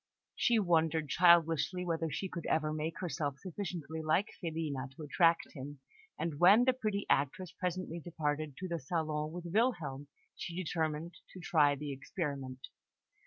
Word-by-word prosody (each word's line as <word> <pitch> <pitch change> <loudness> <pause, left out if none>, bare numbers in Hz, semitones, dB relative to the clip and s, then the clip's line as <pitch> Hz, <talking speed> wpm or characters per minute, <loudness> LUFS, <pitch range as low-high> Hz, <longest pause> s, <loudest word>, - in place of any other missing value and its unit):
She 240 -2 +3
wondered 160 -5 +2
childishly 170 0 +4
whether 165 -1 -1
she 190 - -3
could 170 -3 -6
ever 155 -1 +1
make 155 +1 -3
herself 145 -5 -2
sufficiently 170 -3 -5
like 160 +7 +2
Filina 155 -6 -3
to 155 - -8
attract 165 +3 +3
him; 145 0 -8 0.4
and 160 -3 -3
when 200 +7 +7
the 260 - +4
pretty 215 -5 -2
actress 145 +6 +1
presently 180 -2 -3
departed 155 -3 -3
to 185 - -4
the 170 -2 -2
salon 155 0 -2
with 175 +1 -7
Wilhelm, 170 - 0 0.3
she 170 - -6
determined 165 -1 -2 0.2
to 185 - -9
try 150 -5 +3
the 145 +1 -5
experiment. 135 -2 -4
165 Hz, 150 wpm, -33 LUFS, 150-180 Hz, 0.4 s, when